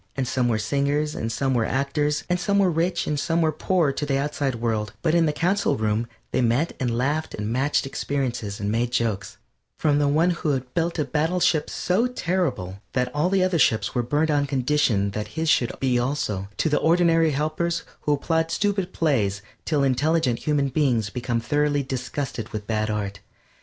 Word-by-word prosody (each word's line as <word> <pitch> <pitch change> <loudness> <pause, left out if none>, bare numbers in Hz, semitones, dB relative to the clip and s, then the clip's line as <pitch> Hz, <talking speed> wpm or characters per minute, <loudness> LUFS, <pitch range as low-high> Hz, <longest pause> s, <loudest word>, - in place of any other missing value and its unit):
And 130 -2 -1
some 125 0 +1
were 115 -2 +1
singers 140 +6 0
and 115 - -3
some 135 +2 0
were 120 -2 +2
actors, 145 +4 0
and 180 0 0
some 200 +2 +1
were 195 -3 +4
rich 170 +3 0
and 150 -1 -1
some 165 +3 0
were 160 -2 +3
poor 170 -3 +1
to 150 - -4
the 140 -2 +1
outside 140 -2 -1
world, 110 -3 -2
but 160 -2 +2
in 170 -1 +4
the - - +2
Council 180 +7 +1
Room 110 +1 0 0.2
they - - +1
met 125 +7 +1
and 120 -3 -1
laughed 150 +5 -1
and 105 0 -3
matched 135 +4 +1
experiences 130 -7 -3
and 100 0 -1
made 115 +2 0
jokes; 110 -5 -1 0.4
from 145 -2 +2
the 145 - +2
one 160 +5 +3
who 170 -3 -1
had 125 -1 -4
built 170 +1 0
a 150 - 0
battle 160 +4 0
ship 155 -3 +2
so 200 +7 +1
terrible 170 - -2
that 125 -1 0
all 150 +5 +1
the 190 -1 +2
other 185 -3 +1
ships 110 -7 +2
were 125 - +1
burnt 150 +6 +1
on 145 -1 +1
condition 130 -7 +1
that 105 +1 -4
his 160 0 +1
should 120 - +3
be 125 -2 +2
also, 110 -7 -2
to - - +1
the 150 - +2
ordinary 165 -1 +4
helpers 155 +4 -1 0.2
who 150 - +1
applaud 160 +3 0
stupid 195 +1 -1
plays 105 - 0 0.2
till 150 -3 +1
intelligent 140 -1 +1
human 145 -2 +1
beings 125 -7 +1
become 120 -1 -1
thoroughly 145 +4 +1
disgusted 130 -2 -4
with 105 -1 -5
bad 110 0 -1
art. 100 -2 -3
140 Hz, 200 wpm, -24 LUFS, 120-160 Hz, 0.4 s, were